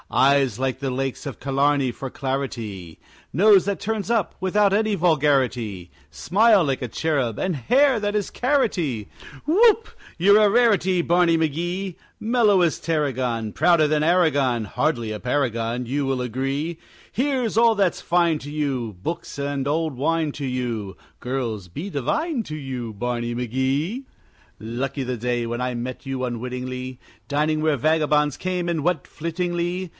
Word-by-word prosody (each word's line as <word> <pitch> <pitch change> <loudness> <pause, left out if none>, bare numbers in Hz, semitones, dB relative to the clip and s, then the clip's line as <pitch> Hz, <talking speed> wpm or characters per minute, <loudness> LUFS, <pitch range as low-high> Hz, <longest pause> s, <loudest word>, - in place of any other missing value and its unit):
Eyes 135 -3 +3
like 130 0 -1
the 135 -1 -2
lakes 135 0 -3
of 140 - -6
Killarney 140 -1 +1
for 135 - -6
clarity, 115 -11 -4 0.3
Nose 195 +3 +5
that 200 0 -2
turns 220 0 -2
up 225 -6 0
without 195 +1 +2
any 215 +1 +2
vulgarity, 135 - +1 0.2
Smile 195 - +3
like 135 -2 -1
a 125 - -3
cherub, 135 -6 -1
and 185 -3 -1
hair 260 - +3
that 205 -1 -1
is 205 -2 -1
carroty 180 - 0 0.4
Whoop, 440 +6 +4 0.3
you're 200 +5 +6
a 210 - +5
rarity, 200 -6 +3
Barney 170 -1 +3
McGee! 175 +4 -2 0.2
Mellow 220 -4 +3
as 170 -3 +2
Tarragon, 130 -8 -1
Prouder 165 -1 +4
than 150 0 +1
Aragon 145 -9 +2
Hardly 120 -2 -1
a 105 - -5
paragon, 125 -2 -1
You 140 +4 -1
will 135 -1 0
agree 135 +7 -2 0.3
Here's 255 -4 0
all 230 -1 +5
that's 195 -4 +1
fine 170 -2 +2
to 145 - -8
you! 130 -9 -2
Books 165 - -5
and 140 -1 -2
old 155 0 -1
wine 155 +3 0
to 145 - -5
you! 120 -6 -3 0.2
Girls 115 -7 -3
be 150 - -6
divine 230 - -1
to 155 - -7
you, 130 -5 -5
Barney 120 +2 -3
McGee! 130 - -1 0.6
Lucky 130 +5 -3
the 125 0 -3
day 120 0 -1
when 120 +1 -3
I 125 0 -1
met 125 +3 -5
you 135 -1 -2
unwittingly, 125 +1 -5 0.3
Dining 155 +2 +1
where 155 -2 +2
vagabonds 150 0 +2
came 180 0 -2
and 165 -4 -1
went 175 -5 0
flittingly. 175 +2 -3
145 Hz, 150 wpm, -23 LUFS, 125-180 Hz, 0.6 s, you're